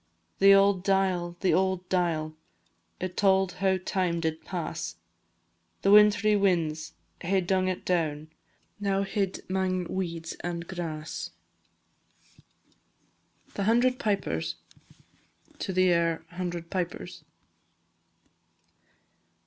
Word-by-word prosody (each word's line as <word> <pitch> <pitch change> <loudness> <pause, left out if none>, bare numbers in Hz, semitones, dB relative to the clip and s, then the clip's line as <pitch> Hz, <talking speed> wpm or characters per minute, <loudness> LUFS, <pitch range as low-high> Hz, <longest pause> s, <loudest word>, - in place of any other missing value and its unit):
The 195 +1 +7
auld 195 -2 +4
dial, 185 -3 +1
the 185 -4 +3
auld 185 +1 +1
dial, 165 -4 0 0.6
It 185 0 -4
tauld 190 -2 +3
how 190 -1 +3
time 185 -2 -1
did 160 -1 -2
pass; 90 - -4 0.9
The 195 - +4
wintry 210 +1 +6
winds 170 -6 0 0.3
hae 190 +2 +1
dung 185 +1 +1
it 185 -1 -3
down, 155 -3 -1 0.5
Now 195 -1 0
hid 195 -1 -3
'mang 185 -1 0
weeds 170 -2 -4
and 170 -1 -4
grass. 160 -4 -5 2.2
THE 200 - -2
HUNDRED 245 +4 +3
PIPERS. 85 - -1 1.1
AIR 170 -3 +2
_"Hundred 175 -1 -5
Pipers." 180 -3 -4
185 Hz, 95 wpm, -28 LUFS, 170-195 Hz, 2.2 s, The